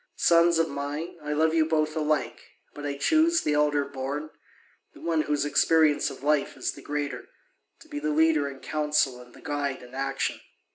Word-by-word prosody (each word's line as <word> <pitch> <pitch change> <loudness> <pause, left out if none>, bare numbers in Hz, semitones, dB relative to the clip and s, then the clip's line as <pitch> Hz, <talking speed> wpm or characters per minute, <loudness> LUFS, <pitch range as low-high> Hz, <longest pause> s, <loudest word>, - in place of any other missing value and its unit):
Sons 170 0 +4
of 165 0 +2
mine, 145 +5 -5
I 150 0 -5
love 160 +1 +2
you 165 -1 +4
both 155 -1 0
alike, 150 -6 -1 0.3
but 145 0 -6
I 140 -1 -3
choose 320 - +3
the 150 - 0
elder 150 -1 +2
born, 140 +3 -5 0.6
the - - -13
one 165 -2 0
whose 150 -1 0
experience 155 0 +3
of 135 - -11
life 150 -1 +1
is - - -1
the - - -12
greater, 145 -1 -4 0.5
to - - -16
be 145 - -5
the 150 +1 -2
leader 155 -1 +3
in 135 -1 -11
council 150 -4 0
and 125 -1 -16
the - - -15
guide 145 -3 -3
in 125 +1 -14
action. 135 +1 -2
150 Hz, 190 wpm, -27 LUFS, 140-160 Hz, 0.6 s, Sons